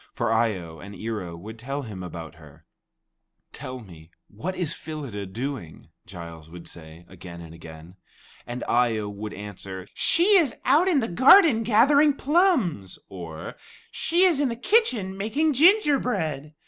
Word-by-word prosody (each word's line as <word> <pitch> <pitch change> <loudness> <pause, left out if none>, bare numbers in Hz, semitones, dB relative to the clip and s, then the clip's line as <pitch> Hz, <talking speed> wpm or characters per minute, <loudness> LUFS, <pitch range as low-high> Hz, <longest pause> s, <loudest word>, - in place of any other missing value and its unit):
For 120 -2 0
Eye 115 -1 +2
o 80 -2 -10
and 100 +4 -10
Ear 110 +2 -4
o 85 -2 -7
would 110 +7 -10
tell 135 +4 -4
him 105 -6 -8
about 85 -3 -8
her. 75 -2 -17 0.9
"Tell 130 -1 -7
me, 85 -6 -15 0.2
what 170 - -5
is 170 -4 -1
Phyllida 145 - -7
doing?" 110 - -6 0.2
Giles 85 -3 -10
would 85 0 -11
say 80 +1 -12
again 90 -1 -11
and 85 -1 -11
again. 80 +2 -13 0.5
And 120 +1 -5
Eye 120 -2 +2
o 105 -1 -3
would 105 +1 -7
answer, 95 -2 -8
"She 390 +5 +3
is 310 -9 +1
out 300 +8 +4
in 320 -8 +3
the 225 - -2
garden 260 - +6
gathering 275 +7 +4
plums"; 275 - +1
or, 85 -4 -8 0.3
"she 345 +3 +1
is 350 -7 +4
in 285 -3 +1
the 230 - -3
kitchen 245 - +1
making 275 +11 0
gingerbread." 250 - +2
120 Hz, 160 wpm, -25 LUFS, -, 0.9 s, garden